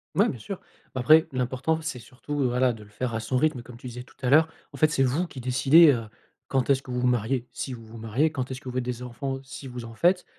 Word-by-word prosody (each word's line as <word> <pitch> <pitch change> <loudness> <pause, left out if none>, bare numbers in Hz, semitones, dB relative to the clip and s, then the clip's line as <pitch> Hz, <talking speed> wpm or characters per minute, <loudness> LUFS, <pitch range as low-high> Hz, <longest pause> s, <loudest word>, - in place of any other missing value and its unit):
Ouais, - - +4
bien 125 - -5
sûr. 190 - -6 0.3
Bah 130 - -2
après, 155 +5 +6
l'important, 130 +5 0
c'est 155 -6 -4
surtout, 130 +6 -7
voilà, 125 +1 +2
de 110 -2 -9
le - - -18
faire 115 +3 -3
à 110 - -1
son 115 +3 -3
rythme, 135 -2 +2
comme 125 0 -12
tu 125 +2 -9
disais 125 0 -7
tout - - -21
à 125 - 0
l'heure. 155 +3 +6 0.2
En - - -10
fait, 155 - +4
c'est 135 -3 +2
vous 145 +8 +1
qui 130 -6 -9
décidez, 135 +6 +6
heu, 115 -3 -2 0.4
quand 135 -1 0
est-ce 135 -1 +4
que - - -15
vous 125 0 -1
vous 125 - +2
mariez. 125 +1 0
Si 130 - -5
vous 115 -2 -10
vous 110 +1 -11
mariez, 115 +8 +1
quand 130 -4 -3
est-ce 130 0 -6
que 130 - -7
vous 125 - -7
faites 130 - 0
des 125 0 -4
enfants, 135 +2 -4
si 135 0 -9
vous 125 -1 -7
en 115 0 -9
faites. 180 +9 +2
125 Hz, 285 wpm, -26 LUFS, 120-140 Hz, 0.4 s, après